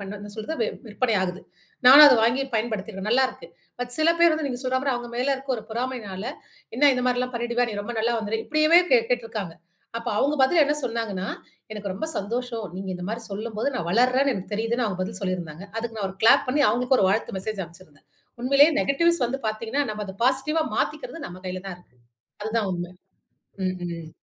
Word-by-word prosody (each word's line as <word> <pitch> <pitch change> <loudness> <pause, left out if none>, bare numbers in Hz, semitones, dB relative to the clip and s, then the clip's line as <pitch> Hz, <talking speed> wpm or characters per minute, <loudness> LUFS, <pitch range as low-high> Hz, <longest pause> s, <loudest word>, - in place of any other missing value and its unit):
பண்ண 195 -1 -7
என்ன 205 0 -9
சொல்றது 225 +9 -5 0.3
விற்பனை 225 +2 0
ஆகுது. 185 0 -3 0.5
நானும் 285 +4 +11
அத 265 -4 +7
வாங்கி 235 +4 +2
பயன்படுத்தியிருக்கேன், 215 -3 -3
நல்லாருக்கு. 260 - +1 0.3
பட், 245 0 -4
சில 315 +1 +3
பேர் 340 -1 +6
வந்து 310 -2 -2
நீங்க 250 -2 -4
சொல்றமாரி 260 +2 0
அவுங்க 240 0 -5
மேலே 255 +3 0
இருக்க 270 0 -7
ஒரு 220 - -7
பொறாமையினால, 225 -5 -4 0.5
என்ன 285 +2 +6
இந்த 250 0 -1
மாதிரிலாம் 250 0 0
பண்ணிடுவியா? 240 +1 0
நீ 210 - -5
ரொம்ப 240 +3 -6
நல்ல 230 +2 +1
வந்துருவியா 220 +1 -3
இப்பிடியேவே 310 +3 +5
கேட் 235 -3 +4
கேட்டிருக்கிறாங்க. 225 -8 -2 0.4
அப்ப 230 +1 -5
அவுங்க 290 +5 +2
பதில் 310 +5 +5
என்ன 295 +1 +1
சொன்னாங்கனா, 225 -5 -3 0.5
எனக்கு 210 -2 -5
ரொம்ப 195 +12 -4
சந்தோஷம். 230 +2 -3
நீங்க 190 0 -6
இந்தமாரி 195 +6 -4
சொல்லும் 215 +2 -5
போது 220 - 0
நான் 170 -9 -3
வளருறேன்னு 255 +6 +3
எனக்கு 195 +1 -7
தெரியுதுன்னு 230 +3 0
அவுங்க 185 -3 -4
பதில் 195 +1 -5
சொல்லியிருந்தாங்க. 180 -3 -4
அதுக்கு 225 0 -4
நான் 200 -3 -2
ஒரு 190 - -10
கிளாப் 230 +5 +6
பண்ணி 285 +3 +2
அவுங்ககளுக்கு 250 +4 +2
ஒரு 190 - +4
வாழ்த்து 200 0 -1
மெசேஜ் 210 +1 -4
அனுப்பிச்சிருந்தேன். 170 -3 -18 0.4
உண்மையிலேயே 280 +5 +5
நெகட்டிவ்ஸ் 335 +1 +2
வந்து 270 +3 -4
பார்த்தீங்கனா, 225 +6 -2
நம்ப 210 0 -4
அத 190 - -8
பாசிட்டிவ்வா 270 +5 +1
மாத்திக்கிறது 330 -12 -3
நம்ம 180 +1 -10
கையில 185 0 -5
தான் 185 - -6
இருக்கு. 175 -8 -26 0.5
அதுதான் 220 -2 -1
உண்ம. 175 0 -5 0.8
ம், 185 - -2
ம். 165 -2 -7
230 Hz, 190 wpm, -24 LUFS, 200-260 Hz, 0.8 s, நானும்